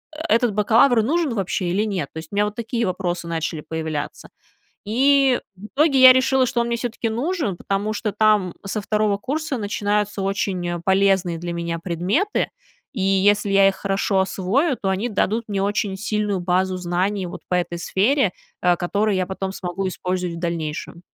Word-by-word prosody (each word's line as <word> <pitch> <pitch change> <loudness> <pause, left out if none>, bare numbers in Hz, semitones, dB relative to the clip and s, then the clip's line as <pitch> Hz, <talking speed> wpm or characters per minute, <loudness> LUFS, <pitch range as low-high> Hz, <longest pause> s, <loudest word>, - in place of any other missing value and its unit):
э, - - -10
этот 230 -3 +3
бакалавр 225 +3 +4
нужен 305 +2 0
вообще 190 -2 -1
или 195 +4 +1
нет, 190 -9 -2
то - - -9
есть 160 0 -7
у - - -6
меня 205 +1 +3
вот 210 0 -4
такие 235 0 -2
вопросы 175 -2 -3
начали 165 -1 -3
появляться. 160 -2 -5 0.6
И 265 +3 +3 0.2
в 190 +3 -12
итоге 285 -2 +3
я 260 0 +10
решила, 260 0 +3
что 240 -1 0
он 235 - -1
мне 235 - 0
всё-таки 235 -1 -3
нужен, 250 - -2
потому 200 +3 -2
что 215 0 -2
там 210 -4 +2
со 210 +2 -3
2 210 0 +1
курса 290 +5 -3
начинаются 205 -1 -1
очень 185 -3 -2
полезные 190 -2 +2
для 175 0 -4
меня 170 -1 -3
предметы, 185 - 0 0.4
и 220 - -3
если 200 +2 +3
я 195 0 +5
их 195 - +1
хорошо 195 0 0
освою, 225 - 0
то 195 - -2
они 195 +6 -1
дадут 220 +2 0
мне 200 -1 -1
очень 200 -1 -1
сильную 210 -1 -1
базу 185 +1 0
знаний 185 +2 -1
вот 175 - -8
по 180 - +1
этой 175 -1 -1
сфере, 210 +6 +1 0.3
э, 175 -1 +3
которую 200 +4 0
я 185 - 0
потом 190 +1 -4
смогу 185 0 -4
использовать 180 -1 -3
в - - -7
дальнейшем. 170 -1 -4
195 Hz, 180 wpm, -22 LUFS, 180-225 Hz, 0.6 s, я